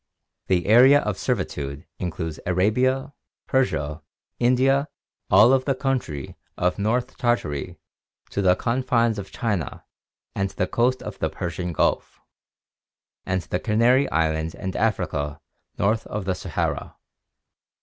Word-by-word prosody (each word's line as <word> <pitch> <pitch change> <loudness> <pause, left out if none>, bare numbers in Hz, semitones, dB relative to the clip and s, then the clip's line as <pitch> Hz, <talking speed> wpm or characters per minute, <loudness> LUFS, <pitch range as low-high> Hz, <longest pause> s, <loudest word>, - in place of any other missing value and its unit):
The 90 -2 +1
area 130 +6 +7
of 105 -2 -3
servitude 70 +2 -3
includes 80 -3 -4
Arabia, 125 +9 +1 0.3
Persia, 80 - 0 0.4
India, 130 +3 +3 0.4
all 105 +6 +7
of 130 -1 +2
the 135 - +1
country 125 - -3 0.2
from 90 0 +2
North 120 +5 -1
Tartary 115 - -1 0.5
to 100 - -1
the 90 -2 +4
confines 115 -1 +1
of 100 - -8
China 100 - -3 0.5
and 100 0 -1
the 90 - -1
coast 125 +5 +1
of - - -7
the - - 0
Persian 85 0 -4
Gulf, 80 - 0 1.1
and 95 -1 0
the 90 - -2
Canary 120 +5 +3
Islands 80 0 0
and 95 0 -5
Africa 80 -9 -1 0.4
north 110 +3 +1
of 105 -2 -4
the 95 - +1
Sahara. - - -3
105 Hz, 125 wpm, -24 LUFS, 90-125 Hz, 1.1 s, area